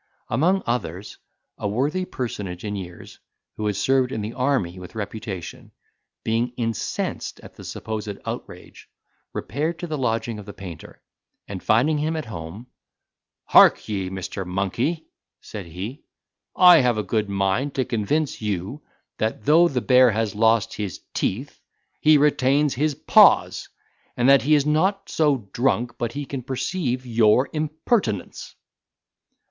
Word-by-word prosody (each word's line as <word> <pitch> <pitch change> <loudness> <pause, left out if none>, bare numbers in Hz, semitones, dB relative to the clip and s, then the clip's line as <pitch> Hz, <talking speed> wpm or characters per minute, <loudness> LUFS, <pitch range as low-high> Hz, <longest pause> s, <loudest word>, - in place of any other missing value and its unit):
Among 175 +11 +2
others, 100 -5 -4 0.4
a - - -2
worthy 145 - -1
personage 105 - -5
in 105 0 -3
years, 90 -3 -9 0.4
who 105 - -2
had 105 - -1
served 130 +3 +2
in 110 - -3
the 105 +3 -5
army 125 -10 0
with 90 +2 -11
reputation, 105 -4 -6 0.5
being 115 +2 0
incensed 115 -3 -3
at - - -13
the - - -13
supposed 105 -2 -5
outrage, - - -8 0.4
repaired 155 +9 -3
to 175 - -5
the 155 -3 -4
lodging 115 -2 -1
of 105 - -11
the 100 - -9
painter, 90 -5 -10 0.4
and 95 -2 -6
finding 145 +8 +2
him 155 +2 -1
at 155 - -3
home, 90 +2 -8 0.8
"Hark - - +6
ye, 95 -3 -2
Mr. 95 +1 -5
Monkey," 100 - -2 0.3
said 100 -5 -8
he, 100 - -7 0.5
"I 180 -2 +8
have 125 -3 +2
a 105 - -1
good 105 +1 -1
mind 100 +8 0
to 130 - 0
convince 125 +8 -1
you, 105 - -3 0.4
that 110 -1 -2
though 165 +4 +6
the 130 -7 -1
bear 130 0 +6
has 110 -2 -1
lost 110 0 +2
his 100 -5 -5
teeth, 130 +9 -2 0.4
he 155 0 +6
retains 145 0 +3
his 150 +2 0
paws, - - +4 0.5
and 120 - +2
that 140 -1 +7
he 150 +3 +4
is 145 -1 +2
not 190 +6 +1
so 140 -9 +1
drunk 120 -1 0
but 120 -1 -2
he 145 0 -4
can 135 -1 -5
perceive 130 0 -2
your 115 +2 +3
impertinence." 155 - -2
120 Hz, 145 wpm, -23 LUFS, 105-145 Hz, 0.8 s, I